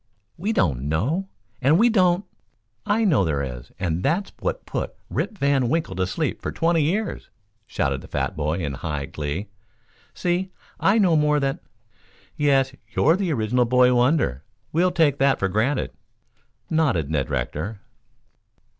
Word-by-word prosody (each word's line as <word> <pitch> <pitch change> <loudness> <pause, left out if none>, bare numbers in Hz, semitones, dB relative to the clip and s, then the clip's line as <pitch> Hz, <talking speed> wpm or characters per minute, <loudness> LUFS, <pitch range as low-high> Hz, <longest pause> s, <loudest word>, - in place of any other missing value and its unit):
"We 195 +6 -2
don't 70 - 0
know, 145 - 0 0.3
and 140 +5 +4
we 230 +5 +5
don't 185 -4 +3 0.3
" 110 +2 -48
"I 225 - +2
know 150 - +4
there 75 -5 0
is, 60 -2 -7
and 85 -2 -1
that's 185 - 0
what - - -3
put - - -4 0.2
Rip 215 - -2
Van 140 -5 +2
Winkle 160 - -1
to 95 -1 +1
sleep 95 - -2
for - - -3
twenty 165 0 +2
years," 195 +9 -1 0.4
shouted 70 - -1
the - - -12
fat - - -2
boy 75 +2 -1
in 70 -4 -2
high 75 0 -3
glee. 75 +9 -4 0.7
"See, 180 +2 0 0.3
I 200 +3 +4
know 185 -6 +4
more 150 -1 +3
than 135 -1 -1 0.4
" - - -31 0.3
"Yes; 135 -2 +2 0.2
you're 160 +3 +4
the 190 -3 -1
original 120 -1 +1
boy 125 +1 +4
wonder. 120 - +2 0.3
We'll 175 +3 +3
take 160 -5 +2
that 135 -1 +4
for 95 - 0
granted," 110 +8 0 0.8
nodded 130 - +1
Ned 75 -4 0
Rector. 85 - -3
130 Hz, 160 wpm, -23 LUFS, -, 0.8 s, we